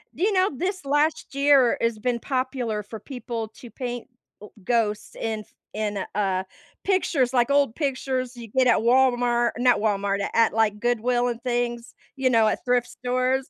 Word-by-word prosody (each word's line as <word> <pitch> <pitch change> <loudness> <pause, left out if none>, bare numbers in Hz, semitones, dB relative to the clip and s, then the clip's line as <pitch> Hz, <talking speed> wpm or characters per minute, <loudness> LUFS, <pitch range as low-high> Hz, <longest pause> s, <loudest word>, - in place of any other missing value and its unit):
Do - - -3
you 425 - +3
know 375 +1 +3
this 370 +4 -3
last 295 +3 0
year 275 -3 +4
has 230 -1 +1
been 240 +1 -1
popular 255 -5 -2
for 220 +2 -9
people 235 -1 -5
to 235 +2 -13
paint, 245 +1 -5 0.3
uh, 210 - -9 0.2
ghosts 220 -2 -1
in 220 -1 -3 0.3
in, 210 -1 -2 0.2
uh, 190 -2 0 0.4
pictures, 300 -10 +1
like, 245 +1 +3
old 280 -4 +3
pictures 260 -3 -2
you 235 -1 -8
get 255 +4 +2
at 240 - +5
Walmart 240 0 +3
not 245 0 +3
Walmart, 200 -2 0
at - - -2
at, 230 -1 +4
like, 215 -1 +1
Goodwill 240 +1 +1
and 235 -1 -5
things, 240 -1 -2 0.2
you 265 -2 +1
know, 225 -3 +4
at 215 - -1
thrift 245 -1 +1
stores. 255 +1 -1
245 Hz, 175 wpm, -24 LUFS, 225-260 Hz, 0.4 s, at